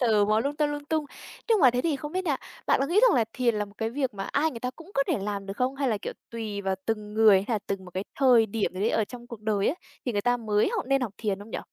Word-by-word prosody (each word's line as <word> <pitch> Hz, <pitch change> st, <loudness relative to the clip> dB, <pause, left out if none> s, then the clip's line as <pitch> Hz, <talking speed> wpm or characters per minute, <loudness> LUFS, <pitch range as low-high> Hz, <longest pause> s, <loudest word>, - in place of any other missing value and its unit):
sờ 220 Hz, -5 st, +4 dB
mó 215 Hz, +1 st, +2 dB
lung 285 Hz, +4 st, -2 dB
ta 300 Hz, -, +2 dB
lung 290 Hz, 0 st, -4 dB
tung. 310 Hz, 0 st, 0 dB, 0.4 s
Nhưng 440 Hz, -5 st, +4 dB
mà 260 Hz, -4 st, +7 dB
thế 245 Hz, +1 st, 0 dB
thì 315 Hz, -4 st, +1 dB
không 295 Hz, +4 st, -7 dB
biết 370 Hz, 0 st, -1 dB
nha, 290 Hz, -5 st, +1 dB, 0.3 s
bạn -, -, +3 dB
có 275 Hz, -, +2 dB
nghĩ 370 Hz, +7 st, +3 dB
rằng -, -, +6 dB
là 230 Hz, -, +3 dB
thiền 245 Hz, -3 st, +1 dB
là 210 Hz, 0 st, 0 dB
một 200 Hz, 0 st, -16 dB
cái 225 Hz, 0 st, -1 dB
việc 265 Hz, -4 st, -2 dB
mà 195 Hz, 0 st, -4 dB
ai 310 Hz, +3 st, +2 dB
người 230 Hz, -5 st, -8 dB
ta 250 Hz, -, -2 dB
cũng 330 Hz, +4 st, -13 dB
có 275 Hz, -, +3 dB
thể -, -, +1 dB
làm 200 Hz, -1 st, -3 dB
được 195 Hz, -, -5 dB
không, 255 Hz, +2 st, 0 dB
hay 275 Hz, -2 st, 0 dB
là, 215 Hz, -3 st, 0 dB
kiểu, -, -, -5 dB, 0.2 s
tùy 220 Hz, -3 st, -4 dB
vào 190 Hz, -1 st, 0 dB
từng 210 Hz, -1 st, -3 dB
người, 215 Hz, -3 st, +7 dB
hay 230 Hz, -, +1 dB
là -, -, +1 dB
từng 195 Hz, -1 st, -3 dB
một 180 Hz, -, -11 dB
cái 190 Hz, +2 st, -2 dB
thời 245 Hz, -5 st, +6 dB
điểm 210 Hz, -1 st, -1 dB
gì 185 Hz, -, -5 dB
đấy 220 Hz, -, +2 dB
ở 220 Hz, -, +2 dB
trong 240 Hz, +2 st, -10 dB
cuộc 235 Hz, -3 st, -9 dB
đời 210 Hz, -2 st, +1 dB
ấy, 330 Hz, -, -1 dB, 0.3 s
thì 245 Hz, -, 0 dB
người 205 Hz, -, +1 dB
ta 245 Hz, +1 st, +3 dB
mới 215 Hz, -, +1 dB
học 380 Hz, -, -2 dB
nên 275 Hz, 0 st, +2 dB
học 235 Hz, -6 st, -2 dB
thiền 205 Hz, -3 st, -1 dB
không 205 Hz, +2 st, -11 dB
nhỉ? -, -, -3 dB
230 Hz, 330 wpm, -27 LUFS, 210-275 Hz, 0.4 s, mà